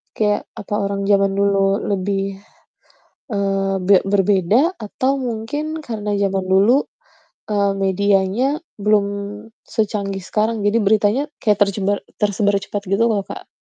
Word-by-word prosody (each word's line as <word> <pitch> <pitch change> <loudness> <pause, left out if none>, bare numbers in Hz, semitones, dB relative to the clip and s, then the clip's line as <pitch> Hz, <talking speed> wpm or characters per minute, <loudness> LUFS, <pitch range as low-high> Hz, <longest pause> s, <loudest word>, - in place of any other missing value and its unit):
kayak 210 -1 0
apa 205 - -7
orang 200 0 -2
zaman 195 -1 +3
dulu 200 0 +2
lebih, 195 0 -2 0.9
eee, 195 -1 0
be 200 - +7
berbeda 205 - +2
atau 255 +5 -1
mungkin 270 +5 -3
karena 220 -8 -4
zaman 195 -1 0
dulu, 215 +9 +4 0.7
eee, 200 -1 +2
medianya 200 - +1 0.2
belum 210 0 +3 0.7
secanggih 200 -3 -1
sekarang, 215 +3 -1
jadi 205 +3 +2
beritanya 215 +4 +3 0.2
kayak 210 -2 +2
tercebar 200 0 +1 0.2
tersebar 205 0 +2
cepat 205 0 -4
gitu 195 +4 +1
loh, 200 -3 -1
Kak. - - -9
205 Hz, 125 wpm, -20 LUFS, 195-220 Hz, 0.9 s, be